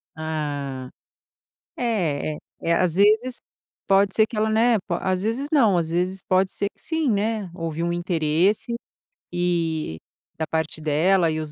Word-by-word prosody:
Ah. 145 Hz, -4 st, -4 dB, 0.9 s
É 175 Hz, -11 st, 0 dB
é -, -, -8 dB, 0.2 s
é 170 Hz, -, +1 dB
às 170 Hz, -1 st, +2 dB
vezes, 220 Hz, +6 st, +3 dB, 0.5 s
pode 195 Hz, 0 st, +3 dB
ser 220 Hz, -, +5 dB
que 220 Hz, -, -7 dB
ela, 215 Hz, +1 st, +2 dB
né, 225 Hz, +2 st, +4 dB
po 175 Hz, -, -1 dB
às 185 Hz, +1 st, 0 dB
vezes 235 Hz, +6 st, -1 dB
não, 230 Hz, -11 st, +4 dB
às 165 Hz, -2 st, 0 dB
vezes 180 Hz, +3 st, 0 dB
pode 185 Hz, 0 st, +2 dB
ser 200 Hz, -, -2 dB
que -, -, -25 dB
sim, 320 Hz, -4 st, -1 dB
né, 210 Hz, -1 st, -1 dB
houve 165 Hz, -2 st, -3 dB
um 170 Hz, -, 0 dB
interesse 175 Hz, +5 st, +1 dB, 0.6 s
e 165 Hz, -, -1 dB, 0.4 s
da 160 Hz, -, -1 dB
parte 160 Hz, 0 st, -2 dB
dela 165 Hz, +3 st, +3 dB
e 155 Hz, -, -2 dB
180 Hz, 155 wpm, -23 LUFS, 160-210 Hz, 0.9 s, ser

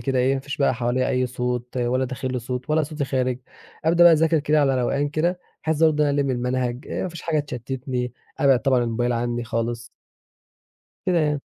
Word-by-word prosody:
كده 135 Hz, -2 st, 0 dB
إيه 130 Hz, +2 st, +3 dB
ما 135 Hz, -, -2 dB
فيش 140 Hz, +1 st, -6 dB
بقى 140 Hz, -3 st, +2 dB
حواليَّ 125 Hz, +1 st, 0 dB
أي 130 Hz, 0 st, +1 dB
صوت، 125 Hz, 0 st, -3 dB
ولا 125 Hz, +1 st, +1 dB
داخل 130 Hz, 0 st, -4 dB
لي 125 Hz, -, -1 dB
صوت 125 Hz, +4 st, -5 dB
ولا 155 Hz, +1 st, +3 dB
صوتي 150 Hz, -1 st, -3 dB
خارج. 130 Hz, -2 st, -1 dB, 0.5 s
أبدأ 170 Hz, +2 st, +5 dB
بقى 170 Hz, -, +9 dB
أذاكر 160 Hz, +1 st, +3 dB
كده 150 Hz, +1 st, +2 dB
على 135 Hz, -2 st, +2 dB
روقان 140 Hz, +4 st, 0 dB
كده 170 Hz, +5 st, 0 dB, 0.2 s
بحيث 160 Hz, 0 st, 0 dB
برضه 155 Hz, -2 st, +4 dB
إن -, -, +2 dB
أنا 145 Hz, 0 st, +1 dB
ألِم 140 Hz, -1 st, 0 dB
المنهج، 125 Hz, +1 st, -2 dB
آآ -, -, -3 dB
ما 185 Hz, -, -2 dB
فيش 170 Hz, -2 st, -9 dB
حاجة 160 Hz, -2 st, 0 dB
تشتتني، 125 Hz, -1 st, -4 dB, 0.3 s
أبعِّد 135 Hz, -3 st, +5 dB
طبعًا 130 Hz, -3 st, +3 dB
الموبايل 120 Hz, +1 st, 0 dB
عني 120 Hz, 0 st, -1 dB
خالص. 115 Hz, +1 st, -3 dB, 1.2 s
كده 180 Hz, -2 st, +2 dB
يعني. 150 Hz, -2 st, 0 dB
130 Hz, 210 wpm, -23 LUFS, 125-150 Hz, 1.2 s, بقى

